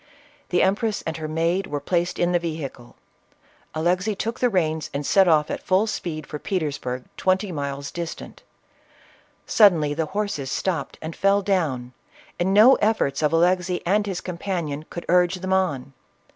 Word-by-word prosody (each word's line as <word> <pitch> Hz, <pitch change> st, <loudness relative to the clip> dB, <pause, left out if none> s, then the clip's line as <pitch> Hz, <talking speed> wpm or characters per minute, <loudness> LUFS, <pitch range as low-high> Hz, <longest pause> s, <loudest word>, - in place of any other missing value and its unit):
The 175 Hz, -, +3 dB
empress 205 Hz, +3 st, 0 dB
and 160 Hz, 0 st, -3 dB
her 155 Hz, -1 st, -4 dB
maid 165 Hz, +4 st, 0 dB
were 145 Hz, -, -3 dB
placed 175 Hz, +4 st, -1 dB
in 175 Hz, 0 st, +1 dB
the 175 Hz, -, +3 dB
vehicle; 155 Hz, -7 st, -6 dB, 0.8 s
Alexey 180 Hz, +6 st, 0 dB
txtok 230 Hz, +4 st, -3 dB
the 250 Hz, -, +3 dB
reins 160 Hz, -6 st, 0 dB
and 145 Hz, +1 st, -2 dB
set 195 Hz, +4 st, +4 dB
off 155 Hz, -3 st, +3 dB
at -, -, -4 dB
full 190 Hz, +3 st, +2 dB
speed 165 Hz, -8 st, -4 dB
for 150 Hz, -, -7 dB
Petersburg, 145 Hz, -9 st, -3 dB
twenty 190 Hz, +1 st, +1 dB
miles 140 Hz, -2 st, -4 dB
distant 170 Hz, -1 st, -7 dB, 1.0 s
Suddenly 165 Hz, -9 st, +4 dB
the 160 Hz, +1 st, -2 dB
horses 195 Hz, -8 st, -3 dB
stopped 165 Hz, 0 st, -2 dB
and 160 Hz, +1 st, -5 dB
fell 200 Hz, +1 st, +2 dB
down, 145 Hz, -11 st, -1 dB, 0.5 s
and 180 Hz, +2 st, +1 dB
no 220 Hz, +7 st, +7 dB
efforts 210 Hz, -11 st, +1 dB
of 150 Hz, -, +2 dB
Alexey 180 Hz, +2 st, +1 dB
and 205 Hz, +3 st, +2 dB
his 185 Hz, -3 st, -3 dB
companion 170 Hz, -5 st, -4 dB
could 170 Hz, -, -7 dB
urge 180 Hz, +1 st, +2 dB
on. 180 Hz, -9 st, 0 dB
175 Hz, 160 wpm, -23 LUFS, 155-190 Hz, 1.0 s, no